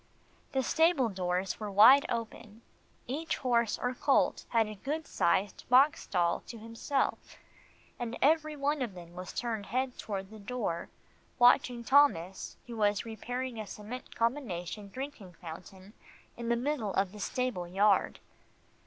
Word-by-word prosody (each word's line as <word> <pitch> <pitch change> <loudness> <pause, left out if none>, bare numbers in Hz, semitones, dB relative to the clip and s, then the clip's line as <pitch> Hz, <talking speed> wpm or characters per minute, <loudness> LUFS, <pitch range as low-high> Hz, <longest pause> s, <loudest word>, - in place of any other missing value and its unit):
The 265 -1 +1
stable 320 -4 +3
doors 185 -1 -2
were 210 -1 -4
wide 225 +8 +7
open. 230 -1 -5 0.4
Each 305 +6 -3
horse 235 -3 +1
or 250 +1 -2
colt 275 +2 +2
had 230 -2 +3
a 215 - -6
good 295 +10 -4
sized 190 +3 0
box 270 +4 +5
stall 175 -2 +1
to 235 - -8
himself, 230 +5 -2 0.6
and 240 0 -4
every 310 +1 +3
one 290 0 0
of 230 -7 -3
them 170 -1 -11
was 180 0 -7
turned 225 -4 -3
head 255 +3 -2
toward 195 -1 -5
the 220 - -10
door, 200 -6 -3 0.5
watching 245 -1 +4
Thomas 220 - +2
who 235 -1 -8
was 205 -1 +1
repairing 245 +2 -5
a 215 - -5
cement 215 +6 -8
combination 215 -5 -2
drinking 260 -6 -7
fountain 185 +4 -11 0.4
in 235 0 -5
the 235 - +3
middle 240 -5 -2
of 195 -1 +1
the 210 - -11
stable 245 -5 -2
yard. 200 +3 +2
230 Hz, 145 wpm, -31 LUFS, 195-255 Hz, 0.6 s, wide